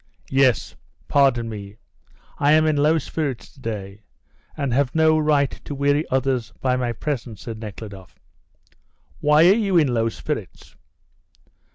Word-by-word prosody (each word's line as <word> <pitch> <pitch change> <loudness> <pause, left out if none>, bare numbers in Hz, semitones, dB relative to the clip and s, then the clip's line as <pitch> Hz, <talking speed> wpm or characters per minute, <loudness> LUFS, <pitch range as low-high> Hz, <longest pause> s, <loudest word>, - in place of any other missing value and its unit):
"Yes; 135 -2 +2 0.3
pardon 135 -5 +3
me, 105 -1 -8 0.6
I 145 +1 +4
am 155 0 +5
in 155 -1 +2
low 150 +3 +3
spirits 145 -4 -4
to - - -20
day, 100 -3 -6 0.6
and 140 -5 -1
have 135 +1 +1
no 160 0 +4
right 150 -3 +2
to 145 - -5
weary 145 +2 +1
others 130 -3 0
by 130 -1 +1
my 125 -1 -1
presence," 120 -3 -5
said 115 -3 -7
Nekhludoff. 100 -5 -9 1.0
"Why 150 +3 +5
are 190 - +7
you 200 -4 +1
in 145 -6 +3
low 115 -1 +1
spirits?" - - -6
135 Hz, 145 wpm, -22 LUFS, 115-150 Hz, 1.0 s, are